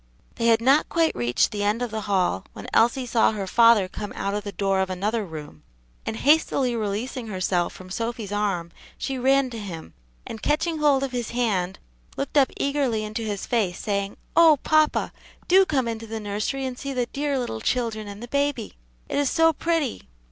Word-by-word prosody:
They 230 - +1
had 225 -1 +4
not 270 +5 +4
quite 330 -1 +2
reached 120 - +1
the 210 -2 -3
end 210 +4 +1
of 240 - -3
the 220 0 -3
hall 190 -3 +1
when - - -9
Elsie 245 +3 +3
saw 230 -2 +3
her 200 -2 -3
father 230 -1 +5
come 205 +2 -6
out 200 0 -2
of 205 0 -2
the 205 - -5
door 195 0 0
of 190 0 0
another 210 +5 -1
room, 150 - -9 0.5
and - - -2
hastily 275 -4 +3
releasing 225 +3 -3
herself 185 -3 0
from 185 0 -12
Sophy's 230 -1 -3
arm, 195 -5 -1 0.3
she 265 -1 -3
ran 265 0 +3
to 230 - -6
him, 170 - -8 0.3
and 220 - -7
catching 320 +1 0
hold 285 -3 +3
of 270 - -2
his 245 -3 -3
hand, 200 -7 -1 0.4
looked 275 +1 -4
up 275 -3 +5
eagerly 275 -6 0
into 215 +2 -4
his 210 -3 -3
face, 205 -7 0
saying, 200 -1 -2 0.2
"Oh, 325 -3 +7
papa, 310 -1 +2 0.3
do 380 +1 +6
come 265 -5 0
into 225 0 -4
the 225 0 -4
nursery 215 +6 -2
and 255 -1 -5
see 275 0 -4
the 250 -2 0
dear 280 +2 -2
little 175 - -3
children 225 - -1
and 205 +2 -8
the - - -7
baby! 280 -4 -1 0.3
it - - -1
is 285 -2 +2
so 325 0 +4
pretty." 320 - -2
230 Hz, 200 wpm, -24 LUFS, 200-270 Hz, 0.5 s, Oh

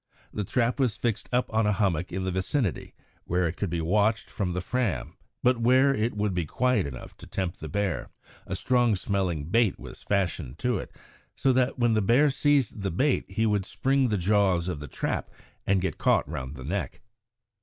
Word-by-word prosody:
The 105 - -2
trap 120 +6 0
was 125 -5 +1
fixed 115 -4 -2
up 125 -2 0
on 110 -1 +2
a - - +3
hummock 95 -4 0
in 95 +1 -3
the 95 - -1
vicinity, 95 - -2 0.3
where 90 0 +1
it 80 - -4
could 100 - -2
be 85 0 -2
watched 105 +6 +1
from 95 -4 -2
the 90 - -1
Fram, 115 +2 -2 0.3
but 125 -1 +3
where 130 +4 +5
it 115 -2 -1
would 105 -1 0
be 90 -3 -1
quiet 125 - +1
enough 65 -2 -9
to - - -12
tempt 95 -2 -3
the - - -6
bear. 100 -9 -2 0.4
A - - -3
strong 120 -3 +2
smelling 95 -6 -1
bait 115 -2 +3
was - - -10
fastened 90 -9 -1
to 125 -5 0
it, - - -7 0.5
so 135 - +2
that 130 +1 +1
when 120 -2 +3
the 110 - +2
bear 125 +8 +4
seized 140 -6 +1
the 95 - -1
bait 130 - +1
he 110 - 0
would 105 -3 +1
spring 135 0 +1
the 105 -3 0
jaws 95 -2 +2
of 90 -5 -3
the 75 - -7
trap - - -3 0.4
and 95 -1 +3
get 95 - -3
caught - - +3
round 70 -2 -5
the 65 -1 -8
neck. 85 -3 -3
100 Hz, 205 wpm, -27 LUFS, 90-120 Hz, 0.5 s, where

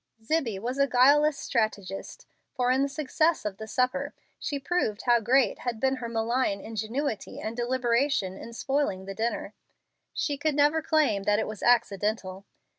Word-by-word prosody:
Zibbie 245 -6 0
was 245 +7 -4
a 275 - +4
guileless 280 +4 +5
strategist, 215 - -3 0.3
for 250 -1 +2
in 260 +1 +2
the 280 - +1
success 310 +1 0
of 200 -2 -3
the 220 - -7
supper 260 +5 -1 0.2
she 285 - -3
proved 270 -7 -1
how 240 -1 +4
great 250 +4 +2
had 240 -3 -3
been 265 +1 +1
her 235 -2 -5
malign 230 -2 0
ingenuity 225 +4 -4
and 220 +1 -4
deliberation 240 -4 0
in 230 - -9
spoiling 265 -7 -1
the 195 - -5
dinner. 220 -1 -3 0.6
She 285 -2 -2
could 300 0 0
never 295 +2 +3
claim 300 -11 +2
that 205 0 +3
it 220 - 0
was 215 -2 -7
accidental. 205 -4 +1
245 Hz, 165 wpm, -27 LUFS, 215-280 Hz, 0.6 s, guileless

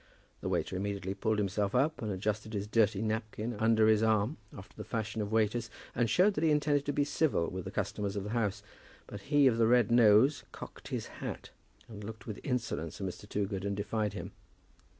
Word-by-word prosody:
The - - -3
waiter - - -1
immediately 100 0 -2
pulled 110 +2 0
himself 100 +1 0
up, 145 +5 +2
and 110 -2 -2
adjusted 105 +3 -2
his 100 -1 -2
dirty 105 -1 +2
napkin 110 +1 -3
under 110 -1 +4
his 110 -1 +4
arm, 110 +4 +2 0.2
after 95 - -12
the 105 - -7
fashion 110 0 -3
of 105 0 -3
waiters, 110 +1 +1 0.2
and 120 -2 +1
showed 200 +3 +4
that 155 - -2
he 160 - +4
intended 145 -1 +2
to - - +2
be 145 - +1
civil 145 - +1
to 95 - -4
the - - -6
customers 100 -1 -2
of 100 - -2
the 105 - -5
house. 105 -3 -1 0.4
But 100 - -9
he 145 +2 +3
of 120 -3 +4
the 115 - +5
red 120 -2 +4
nose 120 +4 +5
cocked - - -10
his - - -3 0.2
hat, - - -6 0.4
and 105 -2 -9
looked 110 +1 -8
with 105 -3 -6
insolence 115 - -3
at 100 - -3
Mr. 100 +3 -7
Toogood, 100 -2 -2
and 100 0 -2
defied 105 +1 -1
him. - - -6
110 Hz, 210 wpm, -31 LUFS, 100-120 Hz, 0.4 s, the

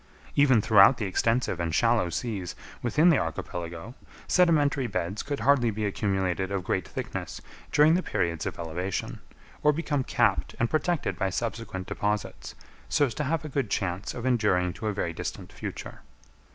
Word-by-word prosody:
Even 130 -6 +5
throughout 105 +4 +7
the 105 - -2
extensive 115 0 0
and 85 -2 -1
shallow 115 -6 +3
seas 100 -3 -4 0.3
within 150 +9 +4
the 160 - +4
archipelago, 85 +5 -5 0.3
sedimentary 150 -7 +3
beds 90 +1 -2
could 145 -2 -4
hardly 125 -1 +4
be 105 0 -2
accumulated 95 -2 -1
of 95 -2 -2
great - - -1
thickness - - -5 0.3
during 150 +2 +5
the 180 - +2
periods 85 - -1
of - - -5
elevation, 85 +3 -4 0.4
or 150 - +5
become 150 -3 -1
capped - - +1
and 120 - +1
protected 155 - 0
by 95 - +1
subsequent 110 -2 -4
deposits, 105 +2 -3 0.3
so 145 - +3
as 120 - -4
to 150 - -2
have 155 +2 -1
a - - -5
good 135 -5 -1
chance 95 0 -2
of 125 -1 -5
enduring 105 -8 +2
to 110 - -5
a - - +1
very 90 -4 -2
distant - - -6
future. - - -7
110 Hz, 165 wpm, -27 LUFS, 95-140 Hz, 0.4 s, throughout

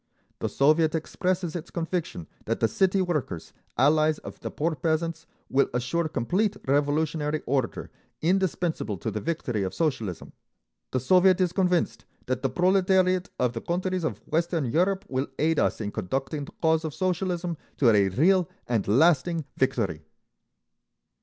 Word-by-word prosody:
The - - -2
Soviet 155 +3 +3
expresses 180 +1 -2
its 170 -1 -5
conviction 165 - -3 0.2
that - - -1
the 115 - +3
city 190 - +2
workers, 150 - -3 0.2
allies 155 +3 +4
of - - -10
the - - -5
poor 160 +2 -1
peasants, 160 +1 -2 0.2
will 140 +1 +2
assure 130 +7 0
complete 185 - 0
revolutionary 150 +2 0
order, 130 -2 -1 0.3
indispensable 175 - 0
to - - -3
the 105 - -4
victory 125 -7 -2
of 95 -1 -3
Socialism. 115 - -2 0.6
The 130 - 0
Soviet 185 +6 +4
is 180 -2 +1
convinced 180 -3 +1 0.2
that 130 0 -2
the 135 - 0
proletariat 185 +3 +2
of 125 -1 +1
the 115 - -4
countries 185 +1 -1
of 110 -8 -4
Western 165 -2 0
Europe 185 +10 +1
will 130 +1 -1
aid 160 +1 +2
us - - +1
in 105 -2 -3
conducting 135 - -3
the - - -14
cause 160 0 +3
of 155 -3 -4
Socialism 180 -2 -1 0.2
to 120 -5 +5
a 100 -1 +4
real 175 - +3 0.2
and 115 -4 -1
lasting 160 - +3
victory. 115 - 0
160 Hz, 150 wpm, -26 LUFS, 130-180 Hz, 0.6 s, to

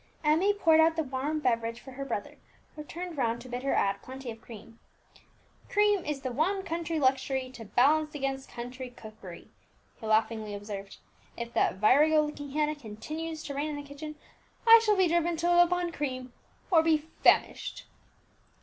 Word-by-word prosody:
Emmie 320 +7 +4
poured 330 -6 +4
out 320 0 +5
the 320 - 0
warm 280 +3 -2
beverage 230 -4 0
for 265 - -12
her 270 +2 -6
brother, 230 -6 -5 0.4
who 300 - -7
turned 345 +2 -7
round 235 -2 0
to 245 - -11
bid 245 0 -4
her 275 - 0
add 200 0 +1
plenty 260 -1 -7
of 225 0 -11
cream. 225 0 -12 0.9
"Cream 415 -2 +3
is 290 -2 -3
the 255 -1 -3
one 370 +10 0
country 335 -2 -3
luxury 265 -1 +1
to 240 -3 -10
balance 300 +7 +2
against 270 -1 -3
country 250 +2 -7
cookery," 215 -7 -12 0.5
he 220 - -7
laughingly 220 -1 +1
observed. 200 -1 -7 0.4
"If 235 0 -6
that - - +2
virago 300 +10 +5
looking 295 -1 -6
Hannah 300 +2 0
continue 305 +6 -6
to 305 -2 -7
reign 290 +2 -2
in 300 - -4
the 290 - -6
kitchen, 300 +2 -8 0.5
I 455 0 +9
shall 425 -2 +3
be 375 -1 +4
driven 340 0 +1
to 335 +2 0
live 350 0 +6
upon 355 0 -1
cream, 255 -5 -4 0.4
or 330 -3 +6
be 320 -1 +3
famished!" 305 +2 +1
285 Hz, 175 wpm, -29 LUFS, 240-320 Hz, 0.9 s, I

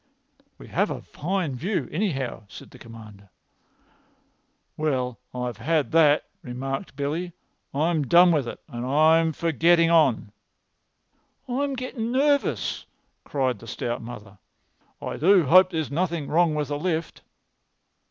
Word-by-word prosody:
"We - - -13
have - - 0
a - - -5
fine 175 -1 -3
view, 185 - -2
anyhow," 140 - -2
said - - -12
the 125 - -15
Commander. 110 -4 -13 1.5
"Well, 130 -6 -2
I've 125 -1 -4
had 150 +5 0
that," 155 -2 +4 0.2
remarked 135 +2 -5
Billy. 155 +5 -3 0.4
"I'm 155 0 0
done 175 +5 +6
with 145 -7 +1
it, - - -7
and 120 0 -6
I'm 160 +5 +4
for 165 +2 -2
getting 170 +2 +4
on." 140 -10 +3 1.2
"I'm 275 +2 -1
getting 245 -2 -4
nervous," 285 +2 0 0.4
cried 130 -6 -1
the 115 - -13
stout 120 +2 -4
mother. 110 -4 -10 0.6
"I - - -5
do 185 +1 +4
hope 185 +6 +6
there 165 -3 -2
is 155 -3 -4
nothing 165 -1 -2
wrong 165 -1 +2
with 150 -1 -2
the 145 0 -2
lift." 165 -1 -3
155 Hz, 135 wpm, -25 LUFS, 125-175 Hz, 1.5 s, done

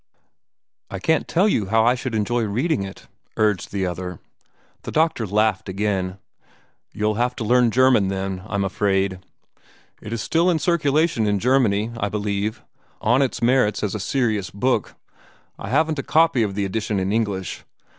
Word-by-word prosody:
"I 95 - -5
can't 160 +12 +1
tell 185 +5 +2
you 110 - +1
how 110 +2 +3
I 120 - +5
should 125 -2 -4
enjoy 120 +3 0
reading 120 - 0
it," 95 0 -8 0.3
urged 105 -3 +1
the 100 -2 -1
other. 90 0 -5 0.6
The - - -7
doctor 155 -8 +1
laughed 105 -1 +1
again. 95 -1 -2 0.7
"You'll 105 0 0
have 125 0 0
to - - -4
learn 120 +2 +4
German, 125 -4 +4
then, 95 -1 -3
I - - -4
'm 100 - +1
afraid. 95 -1 0 0.8
It 105 - -8
is 115 - -2
still 165 +9 +1
in 170 - +2
circulation 155 -6 +1
in 105 -1 +2
Germany, 115 -2 +2
I 100 - -1
believe, 105 +1 -2 0.4
on 120 +5 +2
its 130 -3 -1
merits 115 -5 +2
as 105 - -1
a 110 - -3
serious 110 -4 -1
book. 110 +2 -1 0.6
I - - -6
haven't 155 +3 +1
a - - 0
copy 160 -4 +3
of 100 -3 -1
the 100 -1 -1
edition 105 +1 -2
in 95 +2 -1
English. 100 -5 -2
110 Hz, 170 wpm, -22 LUFS, 100-125 Hz, 0.8 s, I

